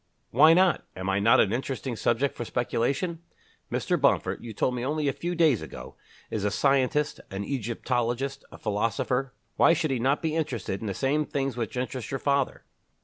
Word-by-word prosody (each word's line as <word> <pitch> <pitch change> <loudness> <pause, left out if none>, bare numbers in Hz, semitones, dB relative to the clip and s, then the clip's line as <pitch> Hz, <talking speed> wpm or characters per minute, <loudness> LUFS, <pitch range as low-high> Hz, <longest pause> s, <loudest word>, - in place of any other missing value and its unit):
"Why 155 +7 +7
not? 185 0 +3
Am 95 +1 -2
I 95 - +1
not 115 +5 +5
an 105 - +3
interesting 130 0 -3
subject 120 +5 0
for - - -4
speculation? 135 - -1 0.5
Mr. - - 0
Bomford, - - +2
you 120 - -6
told 125 +4 0
me 120 -1 -3
only 150 +2 -1
a 140 - +1
few 175 +1 -3
days 160 -9 +3
ago, 80 - -9 0.4
is 105 - -2
a 105 - +2
scientist, 140 +6 +1
an 95 +1 -4
Egyptologist, 125 +2 -2
a - - -10
philosopher. 115 +5 -1 0.2
Why - - +6
should 160 -4 0
he 130 - 0
not 135 +6 +1
be 160 -1 0
interested 120 -11 -2
in 110 - -4
the 100 - -3
same 145 +3 +1
things 135 -3 -2
which 120 0 -4
interest 125 -1 -3
your 135 - -2
father?" 140 -1 0
130 Hz, 190 wpm, -27 LUFS, 115-140 Hz, 0.5 s, Why